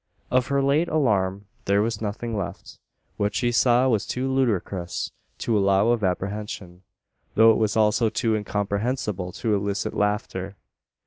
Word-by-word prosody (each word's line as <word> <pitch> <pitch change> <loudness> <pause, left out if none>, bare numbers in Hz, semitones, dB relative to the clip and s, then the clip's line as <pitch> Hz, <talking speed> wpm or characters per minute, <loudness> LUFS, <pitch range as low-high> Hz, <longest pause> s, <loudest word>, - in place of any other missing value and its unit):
Of 125 0 +2
her 140 0 +1
late 145 +5 +2
alarm 100 - +1 0.2
there 100 +1 +3
was 110 -1 -2
nothing 115 +2 -3
left. 100 -4 -6 0.4
What 105 +1 -1
she 120 -1 +1
saw 120 +2 +4
was 110 -5 +1
too 130 +1 -2
ludicrous 100 -8 -1 0.3
to 115 - -1
allow 100 +1 +3
of 120 -3 +1
apprehension; 95 -1 -3 0.5
though 115 +1 +7
it 110 - +2
was 110 0 +1
also 110 +1 +3
too 110 +1 0
incomprehensible 105 -1 -2
to 110 - -1
elicit 100 0 -1
laughter. 100 -2 -2
105 Hz, 145 wpm, -24 LUFS, 100-120 Hz, 0.5 s, though